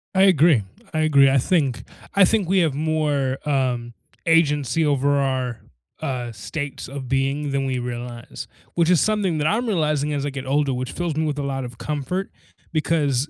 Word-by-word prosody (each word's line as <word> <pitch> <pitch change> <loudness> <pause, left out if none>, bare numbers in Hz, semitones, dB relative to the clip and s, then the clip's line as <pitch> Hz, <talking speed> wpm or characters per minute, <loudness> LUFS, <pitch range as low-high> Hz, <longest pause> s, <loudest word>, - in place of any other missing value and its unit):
I 190 - +5
agree, 160 - +5 0.3
I 155 - 0
agree, 140 -3 +5
I 135 - +3
think 135 -2 +1 0.3
I 200 -1 +7
think 200 -2 +1
we 190 0 +4
have 160 -5 +2
more, 145 -3 0
um, 125 -4 0 0.3
agency 160 -1 +2
over 145 -1 +2
our, 130 -3 -1 0.4
uh, 125 -3 -3
states 145 +7 -6
of 135 -1 -6
being 135 +2 0
than 135 0 0
we 130 -1 -1
realize, 120 -1 -6 0.3
which 170 -1 +2
is 180 -3 +5
something 205 -5 +1
that 150 0 +1
I'm 230 +6 +1
realizing 150 -7 0
as 145 -1 -1
I - - -1
get 135 -1 -6
older, 140 0 +1
which 130 +1 -3
fills 175 -3 -3
me 160 +1 0
with 150 -1 -2
a - - -2
lot 135 -1 -2
of 120 -2 -8
comfort 150 +8 -3 0.4
because 150 -4 +1
145 Hz, 185 wpm, -22 LUFS, 130-160 Hz, 0.4 s, I